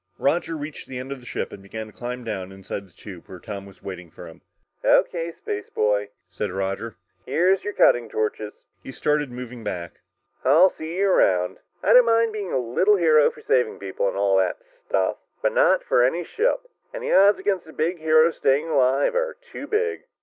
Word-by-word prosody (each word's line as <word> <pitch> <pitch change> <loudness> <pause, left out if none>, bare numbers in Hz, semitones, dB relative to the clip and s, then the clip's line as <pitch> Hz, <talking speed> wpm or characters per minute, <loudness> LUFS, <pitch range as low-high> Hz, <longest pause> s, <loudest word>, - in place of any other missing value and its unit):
Roger 165 +3 0
reached 145 0 -7
the 130 - -7
end 130 +2 -6
of 140 - -5
the 125 - -15
ship - - -4
and 100 - -10
began 110 +3 -7
to 110 - -15
climb 125 +1 -6
down 95 -5 -5
inside 95 +1 -7
the - - -25
tube 90 0 -12
where 95 - -9
Tom 100 0 -8
was 100 - -17
waiting 90 -3 -7
for - - -11
him. - - -14 0.4
"O.K., 170 -1 +2
spaceboy," 105 0 -1 0.2
said 95 +2 -4
Roger, 95 +4 -3 0.3
"here're 175 +8 +3
your 205 +2 -6
cutting 120 -9 +4
torches." 105 -1 -3 0.2
He - - -9
started 150 +1 0
moving 125 -1 -8
back. 90 -4 -5 0.4
"I'll 160 +8 +6
see 160 +2 -7
you 200 +1 +2
around. 90 - +2 0.2
I 205 - +4
don't 250 0 +8
mind 230 -1 +3
being 205 -3 -4
a - - +1
little 130 - +2
hero 155 -5 +5
for - - -14
saving 125 -3 +1
people 100 0 -3
and 95 - -2
all 100 -1 +3
that 95 -1 +1 0.3
stuff. 95 -1 0 0.2
But - - 0
not - - +3
for 120 - +3
any 165 +8 +1
ship. - - -1 0.2
And - - -7
the - - 0
odds 200 +2 +6
against 190 -5 -1
a - - -11
big 170 +3 -1
hero 155 +1 +4
staying 145 +2 +1
alive 135 -1 +2
are - - -1 0.2
too - - -7
big!" 445 +2 -1
130 Hz, 200 wpm, -23 LUFS, -, 0.4 s, don't